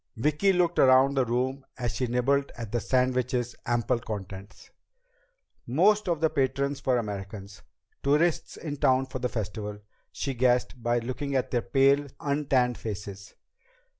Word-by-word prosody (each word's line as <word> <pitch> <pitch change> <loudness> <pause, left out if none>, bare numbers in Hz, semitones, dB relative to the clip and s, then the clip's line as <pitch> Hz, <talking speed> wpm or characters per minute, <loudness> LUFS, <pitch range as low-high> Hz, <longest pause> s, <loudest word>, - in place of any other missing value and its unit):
Vicki 150 - +2
looked 175 -2 +1
around 130 +1 +6
the 135 -2 +2
room 130 +3 -1
as 120 -3 -2
she 125 - -1
nibbled 135 +4 +1
at 115 -3 -6
the 120 - 0
sandwich's 125 0 0
ample 120 0 +1
contents. 100 -2 -8 1.0
Most 195 - +3
of 170 -3 0
the 160 - +3
patrons 140 0 -1
were 130 -2 +2
Americans, 100 -2 -6 0.4
tourists 150 +4 +1
in 145 -3 -5
town 130 0 +3
for 130 0 -6
the 125 0 -1
Festival, 105 -2 -4 0.3
she 135 - -3
guessed, 125 0 +1
by 120 +1 +1
looking 130 +4 -3
at 130 - 0
their 120 - +1
pale, 140 +4 +3
untanned 135 -4 +1
faces. 100 -2 -7
130 Hz, 145 wpm, -27 LUFS, 115-140 Hz, 1.0 s, around